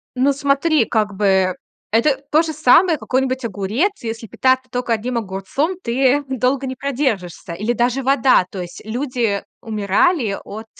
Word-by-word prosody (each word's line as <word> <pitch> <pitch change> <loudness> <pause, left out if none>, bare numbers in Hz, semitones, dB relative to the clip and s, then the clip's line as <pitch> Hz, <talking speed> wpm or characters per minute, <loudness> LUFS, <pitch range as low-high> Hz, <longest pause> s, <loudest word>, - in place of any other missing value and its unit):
Ну, 270 +2 +2
смотри, 280 +1 +2
как 215 -2 0
бы, 190 -2 +2 0.4
это 250 +6 +3
то 310 - +5
же 325 -1 -3
самое, 310 +4 +4
какой-нибудь 260 -1 -1
огурец. 225 - -1
Если 225 0 -5
питаться 260 +3 +1
только 245 -1 -1
одним 235 +3 -2
огурцом, 220 - -2
ты 265 +3 +2
долго 265 +1 0
не 260 - -4
продержишься, 245 - -2
или 210 +7 -2
даже 245 +3 0
вода. 260 -7 +4
То 190 - -6
есть 175 0 -9
люди 235 -3 -1 0.2
умирали 215 - +1
от, 215 +2 -8
250 Hz, 150 wpm, -19 LUFS, 210-275 Hz, 0.4 s, то